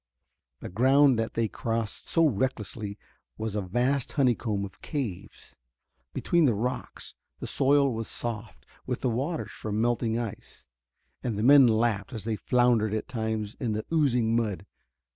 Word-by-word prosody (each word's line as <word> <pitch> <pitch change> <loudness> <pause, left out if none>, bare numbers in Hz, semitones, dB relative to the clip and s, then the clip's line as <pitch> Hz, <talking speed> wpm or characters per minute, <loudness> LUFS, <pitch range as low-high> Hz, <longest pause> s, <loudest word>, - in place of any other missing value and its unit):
The - - -6
ground 130 +5 +4
that 115 - -2
they 115 -1 +1
crossed 115 +1 -4
so 165 -1 +4
recklessly 110 -4 -2 0.4
was 110 -1 -3
a 105 - 0
vast 120 +8 0
honeycomb 120 -7 +1
of 95 - -13
caves. 105 - -6 0.6
Between 170 - +2
the 120 -6 +3
rocks 125 +5 -4 0.3
the - - -5
soil 140 -1 +3
was 115 0 -4
soft 115 -3 -6 0.2
with - - -2
the 125 - +1
waters 140 +8 -2
from 105 -1 -4
melting 115 -1 +1
ice, 115 -3 -7 0.6
and 115 -5 -2
the 105 - -1
men 135 0 +8
laughed 110 -3 +1
as 110 - -5
they 110 0 -1
floundered 115 -1 +2
at 110 - -3
times 110 -3 -3
in 115 -4 -1
the 110 +1 -3
oozing 125 -7 +2
mud. 105 -4 -1
115 Hz, 155 wpm, -27 LUFS, 110-130 Hz, 0.6 s, men